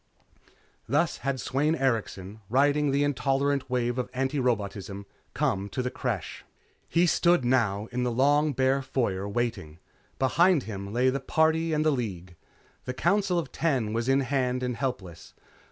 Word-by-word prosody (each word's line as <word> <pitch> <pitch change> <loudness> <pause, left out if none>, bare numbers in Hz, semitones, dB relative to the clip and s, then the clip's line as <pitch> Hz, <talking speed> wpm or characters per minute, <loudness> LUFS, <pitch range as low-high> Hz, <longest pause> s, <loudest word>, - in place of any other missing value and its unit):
Thus 150 +6 +1
had 135 +1 -2
Sweyn 145 +6 0
Erikson, 110 - -2
riding 145 +4 +3
the 140 +1 +2
intolerant 140 -1 0
wave 125 0 0
of 125 - -3
antirobotism, 115 -7 -2 0.3
come 100 +1 0
to 125 - -3
the 125 - -2
Creche. 115 -9 -4 0.5
He 170 +1 +3
stood 170 -4 +3
now, 110 -5 +1
in 125 +1 -2
the 125 - +1
long 145 +5 +3
bare 130 +1 +2
foyer, 100 -7 -2
waiting. 100 -9 -3 0.4
Behind 160 +4 +3
him 100 -2 -6
lay 125 +3 +2
the 135 - -2
Party 160 +4 +1
and 155 0 +1
the 155 - +4
League. 95 - -4 0.5
The 125 - -4
Council 195 +2 +1
of 160 -6 -3
Ten 130 -10 0
was 115 +2 -1
in 135 +1 +4
hand 125 -1 -1
and 125 -1 -2
helpless. 110 - -5
130 Hz, 155 wpm, -27 LUFS, 115-145 Hz, 0.5 s, the